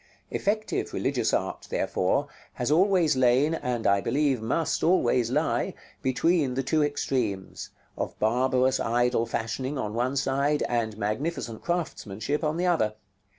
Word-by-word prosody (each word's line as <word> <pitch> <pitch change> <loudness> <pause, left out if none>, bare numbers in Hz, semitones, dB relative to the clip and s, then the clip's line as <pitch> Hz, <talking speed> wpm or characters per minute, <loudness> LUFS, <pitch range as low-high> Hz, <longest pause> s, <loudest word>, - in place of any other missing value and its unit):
Effective 215 +2 -1
religious - - 0
art, - - -2
therefore, - - 0 0.3
has 125 +3 -2
always 175 -3 +4
lain, 130 +4 +3
and 125 -7 -2
I 100 0 +4
believe 140 -2 +1
must 140 +8 -1
always 125 -9 +3
lie, 125 - 0 0.3
between 135 +1 +1
the 135 - 0
two 150 +3 +2
extremes 125 -9 -2 0.3
of - - -4
barbarous 130 +3 +2
idol 120 0 +1
fashioning 130 +5 -3
on 105 -5 -3
one 125 +4 0
side, 140 +2 +1
and 115 -3 -1
magnificent 115 +2 -3
craftsmanship 150 - -2
on 155 +1 0
the 180 - 0
other. 110 -12 +1
130 Hz, 135 wpm, -27 LUFS, 115-150 Hz, 0.3 s, always